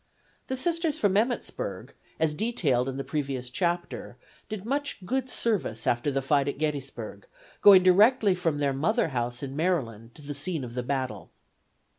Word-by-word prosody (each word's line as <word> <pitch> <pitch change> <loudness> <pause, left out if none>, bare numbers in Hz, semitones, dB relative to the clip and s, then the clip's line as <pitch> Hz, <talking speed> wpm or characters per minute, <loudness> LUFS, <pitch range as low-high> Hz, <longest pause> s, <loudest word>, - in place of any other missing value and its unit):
The 260 - -2
Sisters 335 +2 0
from 200 -2 +2
Emmittsburg, 245 - -2 0.3
as 160 -1 +2
detailed 150 - 0
in 135 - -5
the 135 - -3
previous 135 -5 -3
chapter, 175 +3 -2 0.3
did 210 -2 -5
much 280 -6 -2
good 260 +4 -1
service 205 - 0
after 120 +4 +1
the 135 -1 -1
fight 140 0 +2
at 140 - -2
Gettysburg, 135 -9 -4 0.3
going 195 -3 +9
directly 205 +3 +5
from 170 -4 -1
their 140 -1 +1
mother 165 - +1
house 120 -1 -2
in 135 0 -5
Maryland 120 - -2
to 150 - -12
the 145 +1 -5
scene 150 +1 -3
of 120 -1 -7
the 125 - -2
battle. 125 -8 -3
150 Hz, 165 wpm, -27 LUFS, 130-205 Hz, 0.3 s, going